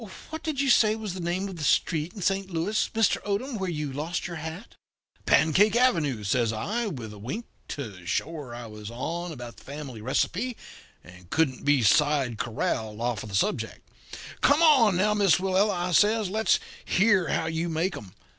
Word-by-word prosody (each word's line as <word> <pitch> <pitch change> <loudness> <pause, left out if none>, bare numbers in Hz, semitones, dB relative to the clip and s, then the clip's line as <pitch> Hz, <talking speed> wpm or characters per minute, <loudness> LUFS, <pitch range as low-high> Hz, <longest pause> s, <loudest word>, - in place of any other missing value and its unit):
What 315 -1 -5
did 310 -4 -3
you 275 -2 +3
say 215 -2 +5
was 215 -4 -5
the 185 - -6
name 180 +3 -2
of 190 -3 -8
that 155 - -5
street 160 +2 +1
in 200 - -6
Saint 195 0 0
Louis, 180 +5 0
Mr. 225 -1 +3
Odom, 210 +4 -2
where 190 -1 -2
you 150 -4 -3
lost 155 +5 -3
your 170 -1 -5
hat?' 160 +7 -8 0.5
"'Pancake 190 +7 +4
Avenue,' 165 - +2
says 115 +3 +1
I, 215 - -2
with 120 - -6
a 105 - -11
wink, 135 - -5 0.2
to 105 -11 -7
show 160 - -1
her 150 -6 -7
that 120 0 -7
I - - -8
was 105 -1 -9
on 170 +9 -4
about 120 -5 -9
the - - -16
family 140 -5 -8
receipt, 195 - -1 0.5
and 90 -1 -15
couldn't 145 -6 0
be 145 -4 +4
side 135 0 +3
corralled 110 -2 -2
off 120 -4 -1
of 110 - -8
the 100 - -4
subject. 210 - -1 0.5
'Come, 285 - +5
now, 210 +3 +3
Miss 200 -6 +4
Willella,' 190 -1 +1
I - - -3
says; 210 +2 +3
'let's 220 +2 +2 0.2
hear 195 -3 +3
how 160 - 0
you 165 +1 -2
make 165 +3 -1
'em. 100 -2 -10
165 Hz, 195 wpm, -27 LUFS, 125-205 Hz, 0.5 s, say